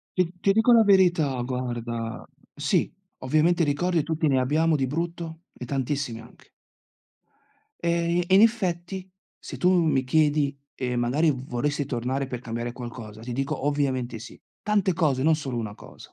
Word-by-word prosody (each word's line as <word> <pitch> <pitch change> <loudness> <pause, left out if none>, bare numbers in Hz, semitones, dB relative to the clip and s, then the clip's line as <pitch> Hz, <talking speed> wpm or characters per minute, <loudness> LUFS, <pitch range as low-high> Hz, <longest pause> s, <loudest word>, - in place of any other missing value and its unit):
Ti 180 -2 +1
ti 195 - +3
dico 225 +4 +4
la 230 -1 +7
verità, 175 - +3
guarda, 120 -2 -4 0.3
sì, - - 0 0.3
ovviamente 155 +6 +2
ricordi 165 +3 +1
tutti 160 +1 -1
ne 135 -3 +3
abbiamo, 155 +5 +2
di 135 -2 0
brutto 165 +2 -4
e - - -7
tantissimi 135 -2 -2
anche. 115 +2 -17 1.3
E 170 +1 +1
e 190 - +4
in 195 - +7
effetti, 190 -4 0 0.3
se - - -8
tu 180 - +3
mi 160 -7 +3
chiedi, 145 0 +2 0.2
e 125 -1 -3
magari 130 +7 +2
v 130 -2 -4
vorresti 145 +4 -1
tornare 130 +1 -2
per 125 -2 -5
cambiare 120 0 -4
qualcosa, 115 -3 -8
ti 120 +1 -5
dico: 135 +2 -2
"Ovviamente 130 -5 -1
sì". 115 - -12 0.2
Tante 205 -3 +2
cose, 150 -7 +1
non 160 +2 +4
solo 135 -5 -4
1 110 -3 -4
cosa. - - -14
145 Hz, 160 wpm, -25 LUFS, 125-170 Hz, 1.3 s, la